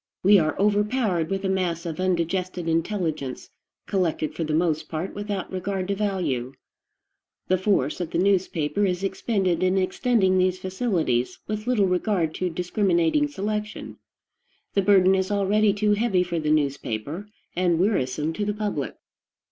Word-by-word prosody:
We 200 Hz, +1 st, +7 dB
are 155 Hz, -1 st, 0 dB
overpowered 205 Hz, -4 st, +1 dB
with 195 Hz, 0 st, -2 dB
a -, -, +2 dB
mass 180 Hz, -3 st, -1 dB
of 165 Hz, 0 st, -4 dB
undigested 180 Hz, -1 st, -1 dB
intelligence, 165 Hz, -5 st, -2 dB, 0.3 s
collected 170 Hz, -5 st, -1 dB
for 165 Hz, -, -3 dB
the 155 Hz, -1 st, -1 dB
mast 160 Hz, -2 st, 0 dB
part 165 Hz, +4 st, -4 dB
without 205 Hz, -2 st, -4 dB
regard 190 Hz, 0 st, -3 dB
to 200 Hz, -, +1 dB
value. 170 Hz, -12 st, -1 dB, 1.0 s
The 185 Hz, 0 st, +3 dB
force 185 Hz, -6 st, +1 dB
of 170 Hz, -, -3 dB
the -, -, -2 dB
newspaper 185 Hz, -2 st, +1 dB
is 185 Hz, -1 st, 0 dB
expended 190 Hz, -2 st, 0 dB
in 185 Hz, +1 st, +2 dB
extending 190 Hz, 0 st, +2 dB
these 185 Hz, 0 st, +2 dB
facilities, 185 Hz, -, -1 dB
with 215 Hz, +1 st, -4 dB
little 235 Hz, -6 st, +3 dB
regard 180 Hz, -3 st, 0 dB
to 185 Hz, -, -2 dB
discriminating 180 Hz, -, +1 dB
selection. 210 Hz, -4 st, -4 dB, 0.8 s
The 200 Hz, -, +3 dB
burden 190 Hz, -1 st, +5 dB
is 190 Hz, 0 st, +1 dB
already 205 Hz, +1 st, +3 dB
too 210 Hz, +1 st, +1 dB
heavy 205 Hz, -4 st, +2 dB
for 170 Hz, -2 st, -2 dB
the 155 Hz, -1 st, -1 dB
newspaper, 145 Hz, -, -1 dB, 0.3 s
and 175 Hz, -2 st, +2 dB
wearisome 160 Hz, -, 0 dB
to 210 Hz, -, -2 dB
the 210 Hz, 0 st, -1 dB
public. 205 Hz, -10 st, -3 dB
185 Hz, 150 wpm, -25 LUFS, 165-205 Hz, 1.0 s, We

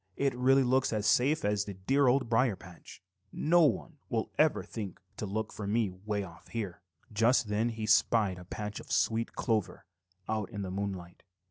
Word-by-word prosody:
"It 140 Hz, -2 st, +1 dB
really 130 Hz, +2 st, +4 dB
looks 130 Hz, +1 st, +2 dB
as 105 Hz, -2 st, -1 dB
safe 140 Hz, +4 st, +3 dB
as 105 Hz, 0 st, +1 dB
the 100 Hz, -, -7 dB
dear 135 Hz, +9 st, +2 dB
Old 130 Hz, 0 st, +3 dB
Briar 115 Hz, -1 st, +2 dB
patch. 90 Hz, -1 st, -14 dB, 0.3 s
No 170 Hz, +3 st, +3 dB
one 135 Hz, -, -1 dB
will -, -, -1 dB
ever -, -, +3 dB
think 100 Hz, -5 st, -7 dB, 0.2 s
to 105 Hz, -, -4 dB
look 110 Hz, +2 st, -3 dB
for 105 Hz, -, -5 dB
me 105 Hz, -1 st, +1 dB
way 100 Hz, +2 st, -3 dB
off 85 Hz, -3 st, -12 dB
here." 105 Hz, -7 st, -5 dB, 0.3 s
Just 115 Hz, +1 st, +3 dB
then 110 Hz, +3 st, +1 dB
he 110 Hz, -2 st, -4 dB
spied 105 Hz, -3 st, +3 dB
a 90 Hz, -, -11 dB
patch 105 Hz, +3 st, -5 dB
of -, -, -11 dB
sweet 115 Hz, +1 st, +1 dB
clover 110 Hz, -6 st, -1 dB, 0.4 s
out 110 Hz, -2 st, -2 dB
in 100 Hz, -1 st, -5 dB
the 95 Hz, -, -5 dB
moonlight. 95 Hz, -3 st, -5 dB
110 Hz, 190 wpm, -31 LUFS, 100-120 Hz, 0.4 s, really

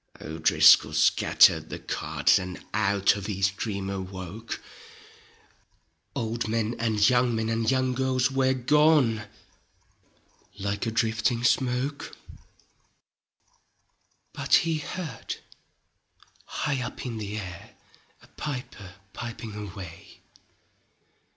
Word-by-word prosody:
O'DriscoU 80 Hz, +1 st, +5 dB
scattered -, -, +4 dB
the -, -, -5 dB
cards -, -, +1 dB
And 90 Hz, 0 st, -7 dB
out 100 Hz, -2 st, +2 dB
of 100 Hz, -1 st, -6 dB
his 100 Hz, -1 st, +1 dB
dream 100 Hz, -1 st, -4 dB
awoke: 95 Hz, +2 st, -6 dB, 1.6 s
Old 115 Hz, -3 st, -2 dB
men 115 Hz, +1 st, -1 dB
and 110 Hz, -2 st, +2 dB
young 125 Hz, -2 st, +3 dB
men 110 Hz, 0 st, -1 dB
and 115 Hz, 0 st, 0 dB
young 130 Hz, -1 st, +1 dB
girls 130 Hz, 0 st, +1 dB
Were 130 Hz, 0 st, +2 dB
gone 130 Hz, -4 st, +3 dB, 1.3 s
like 100 Hz, +3 st, -3 dB
a -, -, -1 dB
drifting 115 Hz, +1 st, 0 dB
smoke; 130 Hz, +3 st, 0 dB, 2.2 s
Bnt -, -, -4 dB
he 165 Hz, -2 st, +2 dB
heard 150 Hz, -6 st, -6 dB, 1.1 s
high 140 Hz, -3 st, -2 dB
up 120 Hz, -, -6 dB
in 115 Hz, -3 st, -4 dB
the 105 Hz, 0 st, -5 dB
air 90 Hz, -4 st, -8 dB, 0.5 s
A -, -, -18 dB
piper 125 Hz, -9 st, -7 dB, 0.2 s
piping 115 Hz, -2 st, -7 dB
away. 95 Hz, -5 st, -9 dB
115 Hz, 100 wpm, -26 LUFS, 100-130 Hz, 2.2 s, O'DriscoU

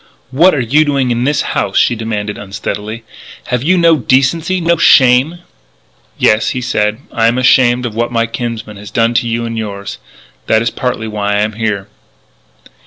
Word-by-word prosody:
"What 165 Hz, +6 st, +4 dB
are -, -, -1 dB
you 135 Hz, +6 st, +2 dB
doing 140 Hz, -4 st, 0 dB
in 120 Hz, +1 st, -1 dB
this 145 Hz, +1 st, +1 dB
house?" -, -, -1 dB
she 120 Hz, -, +3 dB
demanded 105 Hz, -2 st, -4 dB
unsteadily. 105 Hz, +2 st, -6 dB, 0.5 s
"Have 125 Hz, -1 st, -1 dB
you 180 Hz, +7 st, +2 dB
no 165 Hz, -2 st, +4 dB
decency, 150 Hz, +8 st, +1 dB
no 170 Hz, 0 st, +2 dB
shame?" 135 Hz, +6 st, +4 dB, 0.8 s
"Yes," 110 Hz, +1 st, +2 dB
he -, -, 0 dB
said, 105 Hz, -3 st, -1 dB
"I 115 Hz, -2 st, +1 dB
am 120 Hz, +2 st, +1 dB
ashamed 125 Hz, -1 st, +3 dB
of 115 Hz, -, -4 dB
what 120 Hz, +2 st, -2 dB
my 115 Hz, -1 st, +1 dB
kinsman 115 Hz, -2 st, -6 dB
has 105 Hz, +1 st, -10 dB
done 115 Hz, 0 st, +1 dB
to 120 Hz, 0 st, 0 dB
you 115 Hz, 0 st, -2 dB
and 115 Hz, -1 st, -4 dB
yours. 100 Hz, -2 st, -6 dB, 0.5 s
That 110 Hz, +1 st, +2 dB
is 115 Hz, -, -1 dB
partly 125 Hz, -3 st, -3 dB
why 105 Hz, -1 st, -2 dB
I 105 Hz, -, +1 dB
am 110 Hz, +1 st, -1 dB
here." 105 Hz, -3 st, -3 dB
115 Hz, 180 wpm, -14 LUFS, 110-130 Hz, 0.8 s, What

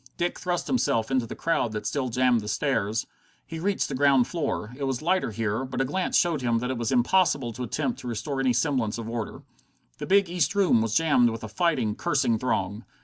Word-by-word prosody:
Dick 175 Hz, +1 st, -1 dB
thrust 180 Hz, -1 st, -2 dB
himself 115 Hz, -, 0 dB
into 130 Hz, -3 st, +1 dB
the -, -, -7 dB
crowd 145 Hz, -9 st, 0 dB
that 105 Hz, 0 st, -4 dB
still 130 Hz, +4 st, -1 dB
jammed 125 Hz, -1 st, +2 dB
the 105 Hz, -, -8 dB
stairs. 110 Hz, -1 st, 0 dB, 0.4 s
He 165 Hz, -, -7 dB
reached 195 Hz, +3 st, 0 dB
the -, -, -5 dB
ground 135 Hz, -2 st, +4 dB
floor. 135 Hz, -9 st, -3 dB
It 140 Hz, +1 st, -3 dB
was 135 Hz, +1 st, -2 dB
lighter 185 Hz, -1 st, +1 dB
here, 110 Hz, +2 st, -2 dB
but 130 Hz, 0 st, -5 dB
a 135 Hz, -, +2 dB
glance 180 Hz, +8 st, 0 dB
showed 165 Hz, -5 st, +1 dB
him 120 Hz, -2 st, +1 dB
that 125 Hz, +2 st, -2 dB
it 130 Hz, -, -3 dB
was 115 Hz, -2 st, -1 dB
impossible 130 Hz, -1 st, +2 dB
to 125 Hz, -, -8 dB
attempt 230 Hz, -, -2 dB
to -, -, -8 dB
restore 120 Hz, +4 st, -3 dB
any 130 Hz, -1 st, +2 dB
semblance 125 Hz, -7 st, 0 dB
of 115 Hz, -1 st, -6 dB
order. 115 Hz, -1 st, -5 dB, 0.6 s
The -, -, -5 dB
big 200 Hz, 0 st, +4 dB
East 175 Hz, +2 st, 0 dB
Room 185 Hz, -, +4 dB
was 110 Hz, -1 st, -1 dB
jammed 145 Hz, -7 st, +4 dB
with 115 Hz, 0 st, -6 dB
a -, -, -4 dB
fighting, 125 Hz, -, 0 dB
cursing 120 Hz, -6 st, +1 dB
throng. 105 Hz, -3 st, -1 dB
130 Hz, 220 wpm, -26 LUFS, 115-160 Hz, 0.6 s, ground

